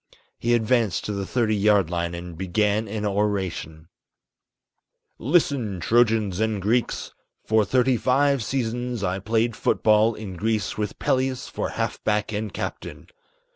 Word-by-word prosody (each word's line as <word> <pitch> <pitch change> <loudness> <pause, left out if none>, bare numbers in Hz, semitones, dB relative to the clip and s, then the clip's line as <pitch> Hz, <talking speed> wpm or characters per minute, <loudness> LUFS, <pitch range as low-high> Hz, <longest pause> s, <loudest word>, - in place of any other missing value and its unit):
He 120 +1 +2
advanced 115 -3 +1
to - - -2
the 100 -1 -3
thirty 115 -4 +1
yard 100 -4 +3
line 85 0 -2
and 85 0 -7
began 105 +5 0
an 105 0 -3
oration: 95 -6 -2 1.3
"Listen, 130 - +1
Trojans 110 0 +2
and 110 -2 0
Greeks! 115 +5 -1 0.3
For 110 0 +3
thirty 130 +3 +2
five 135 +1 +2
seasons, 120 -1 -2
I 95 0 -1
played 110 +3 0
foot - - 0
ball 110 +1 +4
in 95 -4 -7
Greece 110 +2 -1
with 105 -1 -3
Peleus 130 0 0
for - - -3
half - - -2
back 105 0 0
and 105 0 -3
captain. - - -6
110 Hz, 140 wpm, -24 LUFS, 100-120 Hz, 1.3 s, ball